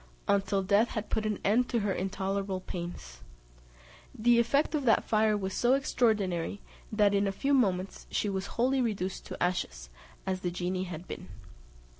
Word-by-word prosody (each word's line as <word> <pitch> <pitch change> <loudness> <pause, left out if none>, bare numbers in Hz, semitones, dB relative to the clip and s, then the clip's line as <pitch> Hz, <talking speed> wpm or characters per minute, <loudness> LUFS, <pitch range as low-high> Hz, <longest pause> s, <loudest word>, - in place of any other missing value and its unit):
until 200 0 +2
death 200 +4 +4
had 215 -2 -5
put 215 -1 0
an 210 -2 -1
end 240 +5 +3
to 235 -3 +1
her 200 -1 0
intolerable 195 +1 -2
pains. 170 - -7 1.0
The 235 +2 +4
effect 280 +7 +2
of 300 -2 0
that 225 - +4
fire 215 -1 +3
was 190 -1 -3
so 245 +2 +3
extraordinary, 205 -9 0 0.3
that 210 -2 +3
in 200 0 +2
a - - +1
few 275 +9 0
moments 195 -7 +1
she - - 0
was 195 -1 -2
wholly 260 +3 +3
reduced 195 -5 -2
to - - -6
ashes, 65 - -2 0.3
as 190 -1 -1
the 180 - -2
genie 180 +1 -2
had 175 0 -7
been. - - -7
200 Hz, 170 wpm, -30 LUFS, 185-225 Hz, 1.0 s, death